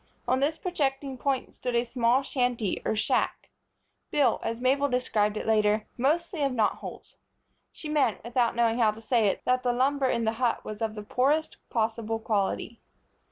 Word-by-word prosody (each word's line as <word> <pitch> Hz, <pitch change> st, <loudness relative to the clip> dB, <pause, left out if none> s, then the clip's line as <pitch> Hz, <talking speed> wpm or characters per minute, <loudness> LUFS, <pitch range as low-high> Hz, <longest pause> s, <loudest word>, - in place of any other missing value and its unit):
On 255 Hz, -, +2 dB
this 300 Hz, +4 st, +1 dB
projecting 275 Hz, -6 st, -2 dB
point 265 Hz, 0 st, -2 dB
stood 250 Hz, -1 st, -3 dB
a 235 Hz, -, +3 dB
small 245 Hz, +2 st, +2 dB
shanty 245 Hz, -6 st, -1 dB
or -, -, 0 dB
shack, 215 Hz, -, -1 dB, 0.6 s
built, 285 Hz, -4 st, +2 dB
as 230 Hz, 0 st, -3 dB
Mabel 275 Hz, +3 st, +2 dB
described 220 Hz, -4 st, +1 dB
it -, -, -4 dB
later, 215 Hz, -1 st, +2 dB
mostly 320 Hz, +6 st, 0 dB
of 275 Hz, -2 st, +1 dB
knot 220 Hz, -4 st, +1 dB
holes. -, -, -10 dB, 0.5 s
She 310 Hz, -, -9 dB
meant, 290 Hz, -8 st, +1 dB
without 235 Hz, 0 st, +1 dB
knowing 235 Hz, 0 st, +2 dB
how 225 Hz, -2 st, +5 dB
to 215 Hz, +1 st, -4 dB
say 230 Hz, -2 st, +2 dB
it, 195 Hz, -, -1 dB
that 255 Hz, 0 st, +2 dB
the 245 Hz, -, +1 dB
lumber 270 Hz, +2 st, +2 dB
in 235 Hz, -2 st, 0 dB
the 220 Hz, -, +2 dB
hut 240 Hz, -2 st, +1 dB
was 215 Hz, 0 st, -7 dB
of 220 Hz, -1 st, -1 dB
the 210 Hz, -, -6 dB
poorest 285 Hz, +8 st, +1 dB
possible 225 Hz, -1 st, -1 dB
quality. 220 Hz, +1 st, -2 dB
245 Hz, 180 wpm, -27 LUFS, 225-270 Hz, 0.6 s, how